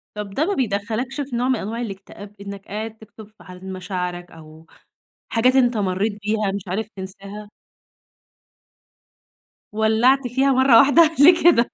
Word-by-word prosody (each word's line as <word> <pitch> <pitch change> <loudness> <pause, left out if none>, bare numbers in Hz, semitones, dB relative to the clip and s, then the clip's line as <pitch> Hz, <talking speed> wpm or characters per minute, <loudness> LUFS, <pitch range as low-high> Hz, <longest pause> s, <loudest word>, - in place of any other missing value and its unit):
طَب 210 -1 -6
ده 300 +9 0
ما 405 - -1
بيدخّلكش 235 - -3
في 260 -3 -6
نوع 245 +2 0
من 260 - +2
أنواع 230 +2 -5
الاكتئاب 205 -1 -9
إنك 200 -1 -9
قاعد 220 +2 -6
تكتب 220 -1 -14
في - - -17
حالة 185 +1 -13
مشاعرك، 180 -1 -5
أو 160 0 -15 0.7
حاجات 250 +3 +2
أنت 245 -3 +3
مريت 200 +2 -1
بيها 210 -2 -1
مش 200 - -4
عارف 205 +5 -3
تنساها؟ 195 +2 -9 2.3
ولّعت 240 +5 +2
فيها 270 +3 +1
مرة 260 -2 +5
واحدة 310 +4 +5
ليه 335 +4 +6
كده؟! 275 -9 +4
220 Hz, 150 wpm, -21 LUFS, 195-255 Hz, 2.3 s, ليه